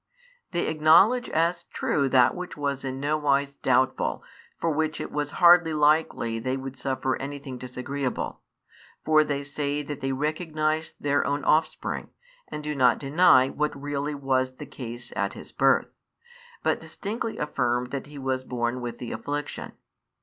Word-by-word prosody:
They 175 Hz, -, -1 dB
acknowledge 165 Hz, +11 st, +5 dB
as 170 Hz, +2 st, +1 dB
true 140 Hz, -2 st, 0 dB
that 125 Hz, -1 st, +5 dB
which 180 Hz, -3 st, -7 dB
was 140 Hz, -2 st, -2 dB
in 130 Hz, 0 st, -4 dB
no 145 Hz, +2 st, 0 dB
wise 140 Hz, -1 st, +1 dB
doubtful 130 Hz, +1 st, +2 dB
and -, -, -24 dB
for 165 Hz, -, +1 dB
which 155 Hz, +1 st, -1 dB
it -, -, -5 dB
was 150 Hz, -1 st, -2 dB
hardly 175 Hz, -2 st, +6 dB
likely 150 Hz, -6 st, +2 dB
they 130 Hz, +3 st, -2 dB
would 135 Hz, 0 st, -6 dB
|34 -, -, -22 dB
suffer 130 Hz, -1 st, -1 dB
anything 140 Hz, -2 st, -6 dB
disagreeable; 130 Hz, +2 st, -4 dB, 0.6 s
for 155 Hz, -1 st, +5 dB
they 145 Hz, -1 st, -2 dB
say 145 Hz, 0 st, -2 dB
that 145 Hz, 0 st, -6 dB
they 135 Hz, 0 st, -1 dB
recognise 155 Hz, +2 st, -1 dB
their 145 Hz, 0 st, +1 dB
own 145 Hz, 0 st, -1 dB
offspring, 155 Hz, 0 st, 0 dB, 0.4 s
and 150 Hz, -, -6 dB
do 150 Hz, 0 st, -2 dB
not 130 Hz, -4 st, +4 dB
deny 140 Hz, -2 st, +5 dB
what 150 Hz, -1 st, -2 dB
really 145 Hz, +1 st, -3 dB
was 130 Hz, -2 st, 0 dB
the -, -, -8 dB
case 120 Hz, -1 st, -8 dB
at -, -, -1 dB
his -, -, -11 dB
birth, -, -, +2 dB, 0.6 s
but -, -, +1 dB
distinctly 220 Hz, +2 st, -5 dB
affirm 125 Hz, -4 st, -1 dB
that 140 Hz, +1 st, -5 dB
he 145 Hz, 0 st, -11 dB
was 130 Hz, -1 st, -2 dB
born 120 Hz, 0 st, -2 dB
with 120 Hz, -1 st, -5 dB
the 120 Hz, -, -6 dB
affliction. 145 Hz, +6 st, -4 dB
145 Hz, 165 wpm, -26 LUFS, 130-155 Hz, 0.6 s, hardly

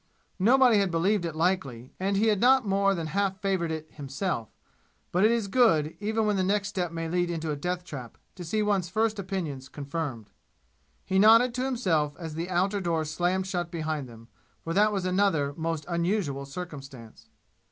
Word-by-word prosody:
Nobody 240 Hz, +2 st, +5 dB
had 195 Hz, -2 st, +1 dB
believed 175 Hz, +3 st, +1 dB
it 165 Hz, -2 st, -4 dB
likely, 150 Hz, -8 st, -1 dB
and 195 Hz, +1 st, 0 dB
he 215 Hz, -, +2 dB
had 210 Hz, -3 st, +3 dB
not 260 Hz, 0 st, +5 dB
more 195 Hz, 0 st, +2 dB
than 165 Hz, -2 st, -3 dB
half 195 Hz, +4 st, -1 dB
favored 190 Hz, -4 st, 0 dB
it 160 Hz, -1 st, -4 dB
himself; 140 Hz, -, -4 dB, 0.6 s
but 180 Hz, +3 st, +2 dB
it 215 Hz, -, +6 dB
is 230 Hz, -3 st, +1 dB
good, 165 Hz, -10 st, +3 dB
even 220 Hz, +1 st, 0 dB
when 210 Hz, -1 st, +1 dB
the 190 Hz, -, +1 dB
next 200 Hz, +1 st, 0 dB
step 180 Hz, -4 st, -2 dB
may 165 Hz, 0 st, -4 dB
lead 175 Hz, +1 st, 0 dB
into 165 Hz, -2 st, -3 dB
a -, -, -1 dB
death 180 Hz, +4 st, -3 dB
trap, 130 Hz, -9 st, -9 dB, 0.2 s
to 180 Hz, -, -9 dB
see 215 Hz, +6 st, 0 dB
one's 195 Hz, -4 st, 0 dB
first 220 Hz, +1 st, 0 dB
opinions 165 Hz, -9 st, -4 dB
confirmed. 140 Hz, -6 st, -5 dB, 0.7 s
He 190 Hz, 0 st, +1 dB
nodded 230 Hz, +4 st, +6 dB
to 250 Hz, +1 st, -2 dB
himself 165 Hz, -, 0 dB
as 165 Hz, -3 st, -6 dB
the 165 Hz, +3 st, -4 dB
outer 190 Hz, +3 st, +1 dB
door 165 Hz, -3 st, 0 dB
slammed 175 Hz, +4 st, 0 dB
shut 175 Hz, -3 st, -3 dB
behind 155 Hz, -5 st, -3 dB
them, 115 Hz, 0 st, -14 dB, 0.4 s
for 165 Hz, -, -3 dB
that 210 Hz, +3 st, +4 dB
was 195 Hz, -3 st, -2 dB
another 180 Hz, -7 st, +1 dB
most 165 Hz, -1 st, -3 dB
unusual 170 Hz, -5 st, -1 dB
circumstance. 135 Hz, -7 st, -9 dB
180 Hz, 185 wpm, -27 LUFS, 155-200 Hz, 0.7 s, it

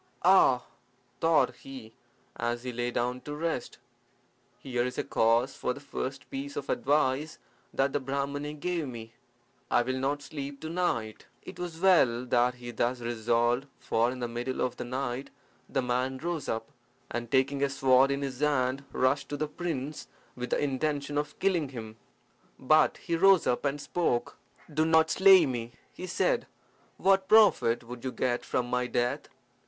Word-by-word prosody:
"Ah!" 155 Hz, -9 st, +6 dB, 0.6 s
thought 165 Hz, -1 st, +3 dB
he, 130 Hz, -5 st, -11 dB, 0.4 s
as 120 Hz, +1 st, -2 dB
he 125 Hz, -1 st, -4 dB
lay 120 Hz, +1 st, -1 dB
down 125 Hz, +1 st, -2 dB
to 145 Hz, -, -6 dB
rest, 165 Hz, +2 st, -3 dB, 0.8 s
"here 125 Hz, -2 st, -2 dB
is 125 Hz, 0 st, -4 dB
a -, -, 0 dB
case 115 Hz, +4 st, +2 dB
for 125 Hz, -, -2 dB
the -, -, -9 dB
first 135 Hz, -2 st, -5 dB
piece 140 Hz, +1 st, -5 dB
of 140 Hz, -, -3 dB
advice 145 Hz, +2 st, +1 dB, 0.3 s
that 135 Hz, 0 st, 0 dB
the 145 Hz, -, +1 dB
Brahmani 140 Hz, +2 st, -3 dB
gave 165 Hz, 0 st, -2 dB
me. 115 Hz, -2 st, -8 dB, 0.6 s
I -, -, +3 dB
will 130 Hz, +1 st, -2 dB
not 145 Hz, +2 st, -1 dB
sleep 140 Hz, -2 st, -6 dB
to 160 Hz, -, -5 dB
night." 115 Hz, -12 st, -2 dB, 0.2 s
It -, -, -10 dB
was 175 Hz, -2 st, -5 dB
well 135 Hz, -10 st, +4 dB
that 125 Hz, 0 st, +2 dB
he 120 Hz, -1 st, -8 dB
thus 120 Hz, +2 st, -1 dB
resolved, 120 Hz, +2 st, 0 dB
for 115 Hz, +1 st, +1 dB
in 125 Hz, 0 st, -6 dB
the 120 Hz, -, -1 dB
middle 120 Hz, +2 st, -4 dB
of 125 Hz, -, -1 dB
the -, -, -6 dB
night 130 Hz, +1 st, -3 dB, 0.4 s
the 135 Hz, -, 0 dB
man 125 Hz, +2 st, -1 dB
rose 165 Hz, 0 st, -3 dB
up, 115 Hz, 0 st, -3 dB, 0.4 s
and 120 Hz, -1 st, -4 dB
taking 135 Hz, +2 st, +2 dB
a 140 Hz, -, +2 dB
sword 135 Hz, -1 st, +4 dB
in 140 Hz, 0 st, -1 dB
his 130 Hz, -2 st, -5 dB
hand, 140 Hz, -2 st, +1 dB
rushed 130 Hz, +2 st, +1 dB
to 145 Hz, -, -3 dB
the 155 Hz, +1 st, -1 dB
prince 150 Hz, -3 st, -4 dB, 0.3 s
with 125 Hz, 0 st, -5 dB
the -, -, +1 dB
intention 145 Hz, +1 st, -1 dB
of 145 Hz, 0 st, -2 dB
killing 175 Hz, -7 st, +1 dB
him. 110 Hz, -4 st, -8 dB, 0.6 s
But 155 Hz, +4 st, +3 dB
he 170 Hz, -, -2 dB
rose 190 Hz, +1 st, +5 dB
up 125 Hz, -, 0 dB
and 140 Hz, +1 st, 0 dB
spoke. 145 Hz, -6 st, -1 dB, 0.4 s
"Do 155 Hz, +1 st, +2 dB
not 160 Hz, 0 st, +4 dB
slay 190 Hz, -3 st, +7 dB
me," 120 Hz, -3 st, -4 dB, 0.2 s
he 185 Hz, -, -7 dB
said. -, -, 0 dB, 0.5 s
"What 195 Hz, 0 st, +3 dB
profit 205 Hz, -, +5 dB
would 120 Hz, 0 st, -9 dB
you 130 Hz, -, -2 dB
get 125 Hz, -1 st, -1 dB
from 125 Hz, -, -1 dB
my 125 Hz, 0 st, 0 dB
death? 120 Hz, 0 st, -1 dB
135 Hz, 170 wpm, -29 LUFS, 120-150 Hz, 0.8 s, slay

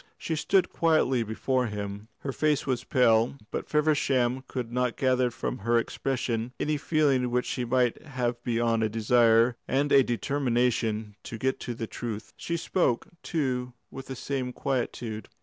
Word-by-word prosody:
She 160 Hz, -, -3 dB
stood 180 Hz, +4 st, +2 dB
quietly 155 Hz, -7 st, +2 dB
before 125 Hz, +3 st, 0 dB
him; 105 Hz, 0 st, -5 dB
her 140 Hz, -, -3 dB
face 150 Hz, +1 st, +1 dB
was 130 Hz, -2 st, -1 dB
pale, 120 Hz, 0 st, +3 dB
but -, -, -4 dB
Feversham 135 Hz, -4 st, +2 dB
could 120 Hz, -3 st, -4 dB
not 125 Hz, -1 st, 0 dB
gather 130 Hz, -1 st, +2 dB
from 125 Hz, +1 st, -4 dB
her 115 Hz, +3 st, +2 dB
expression 120 Hz, -1 st, -2 dB
any 155 Hz, 0 st, 0 dB
feeling 140 Hz, -4 st, +2 dB
which 125 Hz, +1 st, 0 dB
she 125 Hz, -, -2 dB
might 125 Hz, 0 st, +1 dB
have 125 Hz, -5 st, -3 dB
beyond 115 Hz, -1 st, +1 dB
a 110 Hz, -, +1 dB
desire 115 Hz, +1 st, +4 dB
and 140 Hz, +2 st, +1 dB
a 140 Hz, -, +8 dB
determination 120 Hz, -4 st, 0 dB
to 115 Hz, -, -6 dB
get 130 Hz, +1 st, -2 dB
at 120 Hz, -, -3 dB
the 115 Hz, -, -3 dB
truth. 110 Hz, -2 st, -6 dB
She 170 Hz, -, -3 dB
spoke, 160 Hz, -7 st, 0 dB
too, 125 Hz, -6 st, -2 dB, 0.2 s
with 135 Hz, -, -8 dB
the 130 Hz, -, -5 dB
same 130 Hz, 0 st, -3 dB
quietude. 120 Hz, -6 st, -3 dB
125 Hz, 160 wpm, -28 LUFS, 115-135 Hz, 0.2 s, a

